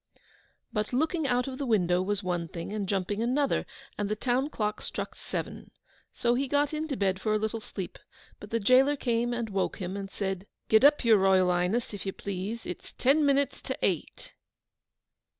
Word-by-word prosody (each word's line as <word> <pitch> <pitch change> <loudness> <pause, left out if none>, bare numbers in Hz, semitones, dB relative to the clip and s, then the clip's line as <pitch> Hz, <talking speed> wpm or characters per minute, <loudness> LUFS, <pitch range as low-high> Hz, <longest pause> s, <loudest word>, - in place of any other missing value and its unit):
But 210 +1 -2
looking 315 +3 +1
out 250 0 +1
of 260 0 -6
the 280 - -1
window 180 -5 +3
was 205 +1 -1
one 175 -2 -1
thing, 170 +4 -6
and 205 -3 -3
jumping 200 +2 -1
another: 265 +4 +1 0.3
and 205 -1 -1
the 215 - 0
town 255 +5 0
clock 210 -7 -2
struck - - -5
seven. - - -5 0.4
So 240 0 +1
he 270 +3 0
got 290 +2 +1
into 305 -3 -2
bed 190 -1 0
for 215 +1 +1
a - - +4
little 220 +1 -2
sleep, 195 -4 -7 0.4
but 205 - -10
the 230 - 0
gaoler 255 +6 +5
came 240 -3 0
and 240 -1 -2
woke 195 -1 -1
him, 185 0 -4
and 200 -1 -5
said, 195 0 -3 0.2
'Git 220 +3 +6
up, 290 -2 +6
your 220 -3 +6
Royal 190 -1 +4
Ighness, 180 +7 0
if 200 -1 -6
you 195 - -2
please, 200 +4 -5
it's 180 - -7
TEN 280 +4 +3
MINUTES 280 -1 +2
TO - - -4
EIGHT! - - -3
215 Hz, 190 wpm, -29 LUFS, 195-255 Hz, 0.4 s, Git